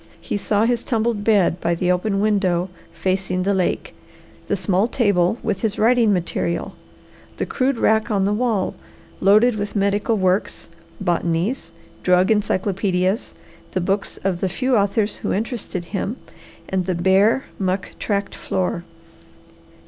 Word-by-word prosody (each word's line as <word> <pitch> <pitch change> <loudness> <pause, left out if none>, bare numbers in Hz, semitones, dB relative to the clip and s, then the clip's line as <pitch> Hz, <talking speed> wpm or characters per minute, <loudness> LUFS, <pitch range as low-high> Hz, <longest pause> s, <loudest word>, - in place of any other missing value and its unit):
He - - -4
saw 205 +1 +1
his 240 0 +1
tumbled 230 -3 -1
bed 205 -5 +3
by 170 0 +1
the 180 +1 +1
open 195 +2 0
window 190 -4 +1 0.2
facing 185 +2 -1
the 200 +2 +1
lake, 185 -2 -1 0.5
the - - +1
small 190 +2 +1
table 205 -5 +2
with 210 -4 -1
his 220 -2 -1
writing 230 -1 +4
material, 170 -2 -1 0.6
the - - -1
crude 265 -1 0
rack 220 0 +2
on 200 -3 +1
the 205 - +1
wall 215 -4 0 0.5
loaded 215 +5 +5
with 205 +1 -4
medical 205 +2 +1
works, 185 -1 0 0.3
botanies, 175 +5 -1 0.3
drug 180 +2 +3
encyclopaedias, 195 0 0 0.4
the 185 - +1
books 195 +3 -1
of 185 -2 -1
the 190 - +1
few 255 +5 0
authors 205 0 +1
who - - -2
interested 215 -5 -3
him, 210 +4 -2 0.5
and 190 -1 -1
the 185 - 0
bare, 195 +8 +3 0.2
muck 190 0 -1
tracked 200 -1 -1
floor. 180 -2 -2
200 Hz, 140 wpm, -21 LUFS, 185-220 Hz, 0.6 s, loaded